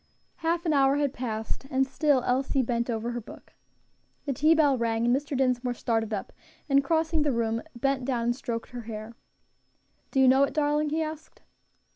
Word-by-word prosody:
Half 335 +1 -1
an 320 - +2
hour 275 -1 +4
had 285 -2 0
passed, 225 0 -4
and 265 -1 +2
still 275 -1 +1
Elsie 265 +1 +1
bent 235 0 -1
over 230 0 -2
her 240 0 -4
book. 220 - -14 0.7
The 280 - -1
tea 310 +5 +4
bell 295 -4 +4
rang, 230 -1 0
and 240 +1 +4
Mr. 285 0 -3
Dinsmore 250 -1 +1
started 225 -2 -1
up, 205 -3 -4 0.3
and 275 -1 +4
crossing 320 +1 +1
the 295 -1 +2
room, 230 -1 0
bent 270 +2 0
down 245 -3 -1
and 240 +1 +1
stroked 235 -3 -5
her 245 -1 -6
hair. 215 +1 -7 0.9
"Do 270 - 0
you 265 - +6
know 265 +2 +5
it, 280 - +1
darling?" 300 0 +1
he 320 +2 0
asked. 310 0 -8
265 Hz, 190 wpm, -27 LUFS, 235-290 Hz, 0.9 s, you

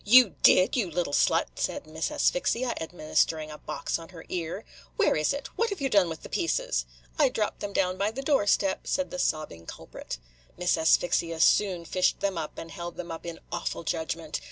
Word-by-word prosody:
"You 240 -1 +7
did, 185 - +6
you 220 -8 +1
little 170 -3 -2
slut?" - - +3
said - - -2
Miss - - -3
Asphyxia, 255 - +1
administering 155 -1 0
a 150 - -9
box - - -3
on 165 - -11
her 165 -3 -11
ear. 170 -2 -4 0.3
"Where - - +3
is 155 0 +2
it? 280 - -4
what 460 - +2
have 400 -4 -4
you 275 -1 0
done 200 -6 +4
with 160 - -7
the - - -7
pieces?" - - 0 0.3
"I 285 -3 +6
dropped 215 -4 -2
them 205 - -4
down 185 -1 0
by 200 +1 +2
the 260 +5 -6
doorstep," 205 -8 +2
said 280 - 0
the 270 - -4
sobbing 150 - -2
culprit. - - -7 0.4
Miss 180 0 +2
Asphyxia 165 0 +2
soon 180 0 +3
fished 185 +2 +1
them 200 -1 0
up, 160 -2 -5
and 165 - -7
held 175 -2 -7
them 175 -1 -6
up 165 +1 -7
in 165 -1 -5
awful - - -3
judgment. 160 0 -3
180 Hz, 200 wpm, -28 LUFS, 165-225 Hz, 0.4 s, You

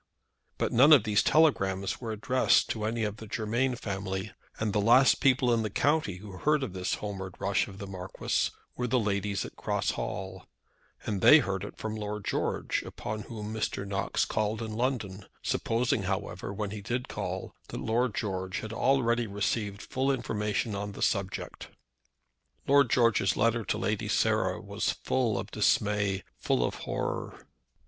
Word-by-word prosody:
But - - 0
none 135 +6 +8
of 135 -8 +7
these 105 -1 +3
telegrams 100 -13 +2
were 115 -2 -3
addressed 125 +4 +2
to 110 -2 -2
any 115 +1 -1
of 105 0 -2
the 110 - -9
Germain 115 +4 0
family, 100 -2 -4 0.3
and 110 -2 -1
the 105 - +2
last 125 +5 +6
people 125 -2 +4
in 115 - +2
the 110 - -2
county 145 - +1
who 100 +2 -10
heard 150 -1 +2
of 120 - -4
this 95 -1 -1
homeward 95 -3 -6
rush 100 0 +1
of 95 - -10
the 100 - -6
Marquis 95 -1 -2 0.3
were 125 - -2
the 125 +2 +2
ladies 100 -2 -1
at - - -10
Cross - - -1
Hall, 95 0 -5 0.6
and 100 -3 -2
they 150 - +9
heard 100 - -1
it 100 - -8
from 110 0 -4
Lord 105 -1 -4
George, - - -1
upon 110 0 -5
whom 110 -2 -5
Mr. 105 -2 -2
Knox 100 0 0
called 110 0 -1
in 110 -1 -5
London; 110 -6 -2 0.2
supposing, 115 -1 0
however, 95 -1 -3
when 100 0 -3
he 105 -1 -6
did 120 +4 -3
call - - -4
that - - -6
Lord 115 0 0
George 95 -3 -2
had 110 0 -6
already 120 -2 +2
received 105 +1 -2
full 130 +1 -1
information 105 -3 -1
on 100 0 -4
the - - -4
subject. 100 -1 -2 1.0
Lord 140 -2 +5
George's 115 -5 +3
letter 115 +1 +2
to - - -1
Lady - - -1
Sarah - - +1
was - - -2
full 115 -6 +1
of 95 0 -5
dismay, 105 -2 +1 0.2
full - - +1
of - - -2
horror. - - -4
105 Hz, 170 wpm, -29 LUFS, 100-120 Hz, 1.0 s, they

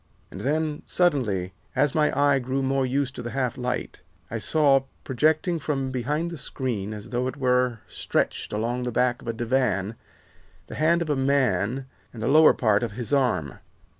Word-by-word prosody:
"And - - -8
then, 150 +1 -1
suddenly, 110 - +1 0.2
as 140 +1 +2
my 150 -1 +3
eye 145 -1 +4
grew 130 +2 -2
more 135 0 +1
used 135 0 -1
to - - -4
the 120 - -5
half 130 -1 -1
light, 125 0 -4 0.3
I 115 - -2
saw, 135 +1 +3 0.2
projecting 155 +6 +1
from 135 -3 -2
behind 150 +7 -2
the 165 - -6
screen 110 -7 -3
as 105 +1 -8
though 125 +1 0
it 130 - -5
were 125 -3 +1
stretched - - -2
along 115 +4 -1
the 125 0 -2
back 125 +1 +1
of - - -13
a 115 - -1
divan, 115 -4 0 0.7
the - - -10
hand 170 +2 +2
of 155 - -3
a - - +2
man 130 -3 +1 0.3
and 115 -2 -7
the - - 0
lower 155 +3 +6
part 105 -4 +2
of 115 -3 -3
his 120 +4 -5
arm. 110 - +1
130 Hz, 185 wpm, -25 LUFS, 120-145 Hz, 0.7 s, lower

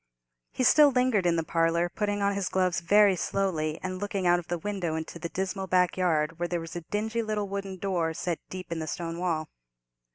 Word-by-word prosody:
He - - -1
still 295 +3 +7
lingered 250 -8 +2
in 170 - +3
the 165 - 0
parlour, 165 +1 +1
putting 205 +2 -2
on 200 0 +2
his 200 -1 -2
gloves 185 -2 +1
very 200 +3 +5
slowly, 165 -5 -1
and 185 0 -3
looking 200 -2 -2
out 175 0 +4
of 170 - -10
the 175 - -1
window 180 -3 -3
into 160 +1 -5
the 170 - -4
dismal 190 +1 -3
backyard, 175 -3 +1
where 175 - 0
there 175 0 -1
was 165 0 -8
a 175 - -3
dingy 220 +6 -2
little 215 -2 -2
wooden 195 -1 -5
door 175 -4 -1
set 175 -1 -2
deep 185 -2 -8
in 165 - -2
the 160 - -4
stone 165 +1 -4
wall. 165 -4 -1
180 Hz, 215 wpm, -28 LUFS, 170-200 Hz, -, still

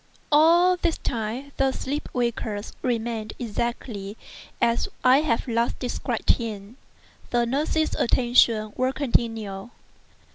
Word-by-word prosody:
All 340 +4 +5
this 340 -2 0
time 235 +4 -4
the 270 0 +2
sleeper 280 +3 -4
waker 235 -3 -1 0.2
remained 230 -3 -2
exactly 225 -3 -4 0.4
as 235 0 +1
I 255 +2 +6
have 255 -7 0
last 235 0 0
described 245 -2 0
him. 215 0 -6 0.5
The 240 -1 +2
nurses' 300 +5 0
attentions 230 -3 +3
were 255 +1 0
continual. 225 -6 -1
240 Hz, 110 wpm, -25 LUFS, 225-270 Hz, 0.5 s, I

